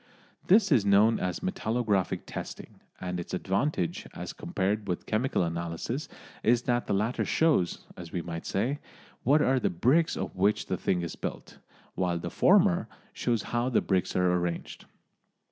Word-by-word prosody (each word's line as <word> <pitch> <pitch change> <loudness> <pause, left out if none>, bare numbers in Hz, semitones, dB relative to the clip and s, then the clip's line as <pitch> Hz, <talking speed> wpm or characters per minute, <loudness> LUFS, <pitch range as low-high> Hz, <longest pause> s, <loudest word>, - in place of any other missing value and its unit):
This 200 0 +5
is 125 -8 +5
known 100 +3 +4
as 90 -1 -2
metallographic 110 - 0
testing, - - -8 0.2
and 90 -1 -3
its 85 - -4
advantage 95 - -1
as - - -6
compared 100 +3 -2
with 90 - -3
chemical 110 -2 0
analysis 85 - -3 0.3
is 120 +1 +3
that 120 -1 0
the - - 0
latter 110 +5 0
shows, 155 - +1
as 85 -2 -9
we 85 - -3
might 85 -1 -6
say, 130 +9 -1 0.4
what 145 +4 +4
are 130 0 +3
the - - +1
bricks 135 - +2
of - - -4
which 100 +3 +2
the - - -2
thing 90 -2 0
is 85 - -5
built, - - -6 0.3
while 90 -2 0
the 85 0 -5
former 190 -1 +4 0.3
shows 115 -4 0
how 120 +1 +1
the 120 - +3
bricks 95 -3 0
are 90 -1 +3
arranged. 90 -1 -3
105 Hz, 160 wpm, -28 LUFS, 90-125 Hz, 0.4 s, This